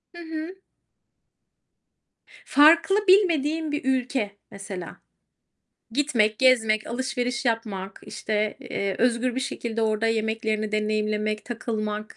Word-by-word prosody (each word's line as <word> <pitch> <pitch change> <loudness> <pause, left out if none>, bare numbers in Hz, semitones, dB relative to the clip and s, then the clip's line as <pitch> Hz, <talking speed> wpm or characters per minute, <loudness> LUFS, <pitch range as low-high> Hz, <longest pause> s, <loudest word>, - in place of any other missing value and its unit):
Hı - - -10
hı. 320 +2 -6 1.9
Farklı, 335 +8 +5
bilmediğim 325 -5 +3
bir 295 -3 -3
ülke 260 -4 0 0.2
mesela. 195 -3 -7 0.9
Gitmek, 230 -5 +1
gezmek, 225 -5 +3
alışveriş 245 0 -2
yapmak, 205 -5 -2
işte, 210 0 -2
eee, 195 -1 -3
özgür 245 +1 +1
bir 260 - -1
şekilde 230 -4 -3
orada 220 0 +1
yemeklerini 220 -1 -1
deneyimlemek, 215 0 -1
takılmak. 215 -3 -4
230 Hz, 100 wpm, -25 LUFS, 215-265 Hz, 1.9 s, Farklı